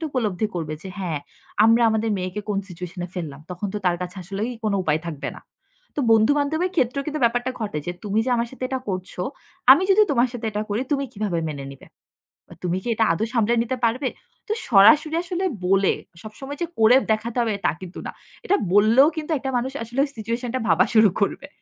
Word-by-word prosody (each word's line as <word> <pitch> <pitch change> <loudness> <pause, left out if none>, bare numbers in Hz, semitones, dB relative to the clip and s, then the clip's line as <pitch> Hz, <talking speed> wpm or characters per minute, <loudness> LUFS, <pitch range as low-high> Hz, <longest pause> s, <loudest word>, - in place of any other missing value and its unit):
টি 325 - -3
উপলব্ধি 215 -5 0
করবে 155 -3 -3
যে 190 - -7
হ্যাঁ, 165 -6 -2 0.4
আমরা 230 +1 +5
আমাদের 220 0 0
মেয়েকে 185 +3 -3
কোন 200 -1 0
সিচুয়েশন 180 +1 -8
এ - - -17
ফেললাম। 150 -5 -5
তখন 180 +3 -4
তো - - -1
তার 175 -1 +3
কাছে 180 +2 -7
আসলেই 200 +6 -3
কোন 210 - +1
উপায় 155 -2 +1
থাকবে 150 -4 -4
না। - - -13 0.5
তো - - +1
বন্ধু-বান্ধবের 290 +10 +2
ক্ষেত্রেও 275 +1 +1
কিন্তু 305 -1 -3
ব্যাপারটা 245 +2 +1
ঘটে 205 -8 -2
যে, 175 - -2
"তুমি 205 +1 0
যে - - +1
আমার 235 0 -1
সাথে 255 - -6
এটা 260 -1 -2
করছ, 185 -1 -4 0.6
আমি 320 +7 +4
যদি 425 +2 +6
তোমার 250 -2 +3
সাথে 235 -2 -5
এটা 210 +1 -1
করি 220 +5 0
তুমি 275 -1 +1
কিভাবে 200 -5 -2
মেনে 140 -2 -6
নিবে? 135 - -15 0.8
তুমি 180 +1 0
কি - - -7
এটা 225 - +3
আদৌ 215 - -1
সামলে 230 -1 +2
নিতে 255 +2 -3
পারবে?" 255 +4 0 0.4
তো 430 - 0 0.2
সরাসরি 255 +10 +6
আসলে 365 +1 -2 0.2
বলে, 195 0 +3 0.3
সবসময় 270 +7 -8
যে 345 - 0
করে 225 +3 +7 0.2
দেখাতে 220 +2 -1
হবে 225 -2 0
তা - - +4
কিন্তু 180 -1 -8
না। - - -5 0.3
এটা 400 - +3 0.2
বললেও 225 +7 +6
কিন্তু 315 +1 -4
একটা 265 0 -3
মানুষ 260 +2 -2
আসলে 240 +4 -5
ওই 285 - -2
situation 230 +3 -3
টা - - 0
ভাবা - - +5
শুরু 215 -2 +7
করবে। 275 +7 -1
220 Hz, 210 wpm, -23 LUFS, 190-260 Hz, 0.8 s, করে